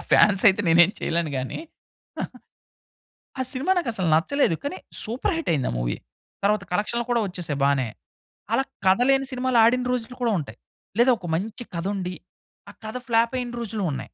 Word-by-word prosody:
Fans 200 -1 +6
అయితే 190 +2 +3
నేను 165 +1 +6
ఏమి 195 - -3
చేయలేను 165 -2 -1
గాని, 130 0 -3 1.8
ఆ - - +3
సినిమా 280 +9 +1
నాకసలు 220 - -1
నచ్చలేదు 180 - +2
కానీ 285 +6 -4 0.2
సూపర్ 255 - -1
హిట్ 330 - -2
అయింది 135 -5 0
ఆ - - -4
మూవీ - - -1 0.5
తరువాత 210 +1 +2
కలెక్షన్లు 235 +5 0
కూడా 235 -1 +3
వచ్చేసాయి 175 -6 -4
బానే. 140 -4 +2 0.6
అలా 265 +4 +3 0.2
కథ 190 +3 +5
లేని 270 0 +3
సినిమాలు 255 -1 +1
ఆడిన 250 +2 +3
రోజులు 250 0 -3
కూడా 230 -2 +2
ఉంటయి. 120 -7 -7 0.4
లేదా 250 +2 +6
ఒక 180 - -8
మంచి 210 +7 -3
కథ 170 +1 -3
ఉండి 185 -1 -3 0.6
ఆ - - -11
కథ 220 - -5
ఫ్లాప్ 230 +2 +3
అయిన 240 -1 -5
రోజులు 215 -3 -3
ఉన్నాయి. - - -3
215 Hz, 170 wpm, -24 LUFS, 170-250 Hz, 1.8 s, Fans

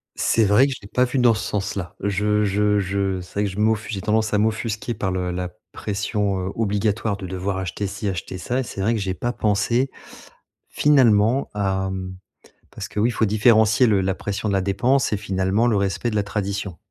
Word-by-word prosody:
C'est 115 -2 +2
vrai 105 +7 +5
que 135 - -2
je - - -10
l'ai - - -9
pas 125 +4 +2
vu 125 +2 -3
dans 125 -2 +5
ce 105 - -3
sens-là. 100 -3 -3
Je 105 +1 +1
je 105 +1 +2
je 95 -1 -1
c'est 90 +3 -7
vrai - - +2
que - - -1
je 95 - -9
m'offu 110 +1 +1
j'ai 100 -3 -3
tendance 110 +1 +1
à - - +4
m'offusquer 110 +1 -1
par 95 -3 -2
le 90 -1 -2
la 90 0 -3 0.2
pression, 105 -1 -2
heu, - - -5
obligatoire 105 -1 0
de 95 - -7
devoir 95 +1 -3
acheter 95 +2 -3
ci, 100 +2 -5
acheter 90 0 -4
ça 125 +8 -2
et - - 0
c'est 100 -4 -6
vrai 110 +4 +2
que 110 - -1
j'ai 95 -1 -2
pas 120 +5 -2
pensé, 115 +5 +1 0.8
finalement, 125 -3 +3
hem 95 -2 -2 0.6
parce - - -7
que, 105 - -3
oui, 115 - +3
il - - -1
faut 110 - +1
différencier 110 +2 +4
le 105 -3 +3
la 95 0 0
pression 105 +2 -3
de - - 0
la 95 - +2
dépense 120 +7 +1
et - - +1
finalement 95 +2 0
le 115 -3 +2
respect 100 +4 -1
de - - -5
la 105 - +2
tradition, 100 -3 -3
105 Hz, 220 wpm, -22 LUFS, 95-110 Hz, 0.8 s, vrai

